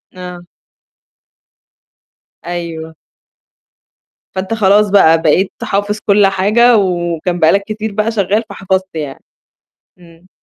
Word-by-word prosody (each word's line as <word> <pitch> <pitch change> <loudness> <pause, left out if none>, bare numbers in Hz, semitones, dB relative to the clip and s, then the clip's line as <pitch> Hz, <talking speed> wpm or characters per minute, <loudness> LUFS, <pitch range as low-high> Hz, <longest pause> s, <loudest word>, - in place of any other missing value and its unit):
آه. 180 -1 -9 2.0
أيوه. 165 -2 -6 1.4
فأنت 190 +3 -3
خلاص 210 -1 +3
بقى، 165 -5 +4
بقيت 175 +4 +2
حافظ 205 +2 -2
كل 200 -1 +4
حاجة 215 +5 +3
وكان 175 -2 -1
بقى 160 -1 +4
لك 200 0 +1
كتير 215 0 -5
بقى 215 +2 -1
شغّال 210 0 0
فحفظت 190 -2 -3
يعني، 145 -3 -6 0.8
إمم. 170 +1 -19
190 Hz, 105 wpm, -14 LUFS, 175-205 Hz, 2.0 s, بقى